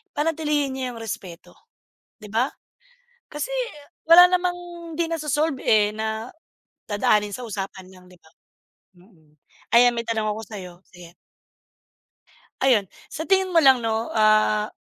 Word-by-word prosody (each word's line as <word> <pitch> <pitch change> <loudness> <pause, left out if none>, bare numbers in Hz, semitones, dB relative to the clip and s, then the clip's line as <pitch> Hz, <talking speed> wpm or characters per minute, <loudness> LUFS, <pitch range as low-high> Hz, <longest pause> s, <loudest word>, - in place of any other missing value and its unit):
panatilihin 295 -3 -1
niyo 265 - -4
'yung 230 - -10
respeto." 190 -6 -8 0.7
Di 210 - -11
ba, 240 +5 +1 0.8
kasi 300 +12 -4 0.6
wala 350 +2 +9
namang 360 -1 0 0.4
di 340 - 0
naso-solve, 305 -2 -1
eh, 210 -1 +3
na 220 +2 -4 0.6
dadaanin 205 0 +1
sa 250 - -8
usapan 195 -3 -6
lang 185 -1 -17
di 180 0 -18
ba? 160 - -23 0.7
Mm. 165 -6 -24 0.4
Ayan 245 +1 +6
may 235 0 -3
tanong 220 -2 -1
ako 210 +1 -3
sa'yo, 195 -4 -9 0.2
sige. 175 -1 -15 1.5
Ayun, 230 -8 +2 0.2
sa 320 - -6
tingin 380 +1 +2
mo 330 - +5
lang 265 -2 +6
'no, 225 -1 -2
ah, 215 -1 +3
225 Hz, 135 wpm, -23 LUFS, 205-295 Hz, 1.5 s, wala